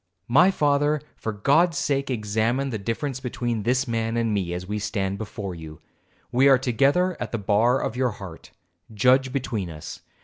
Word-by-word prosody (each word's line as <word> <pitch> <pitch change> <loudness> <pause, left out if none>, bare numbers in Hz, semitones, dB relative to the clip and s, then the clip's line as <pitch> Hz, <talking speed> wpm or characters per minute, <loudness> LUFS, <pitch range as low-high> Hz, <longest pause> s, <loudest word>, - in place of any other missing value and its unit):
My 160 +10 +5
father, 145 -3 +2 0.2
for 110 - -4
God's 145 - +2
sake 140 -1 0
examine 115 +3 0
the 110 - -3
difference 125 +6 -3
between 120 -3 -3
this 125 +5 +1
man 115 0 -1
and 115 -2 0
me, 95 -4 -1
as 90 +1 -4
we 105 +2 -3
stand 100 -2 -2
before 105 -3 -5
you. 80 -2 -10 0.5
We 135 +3 +5
are 135 - +7
together 140 +9 +2
at - - -4
the 115 - -1
bar 110 +5 +2
of 110 - -3
your 125 0 +1
heart, 95 -6 -10 0.4
judge 130 +4 +3
between 120 -9 -3
us. 75 -2 -8
115 Hz, 175 wpm, -24 LUFS, 105-135 Hz, 0.5 s, are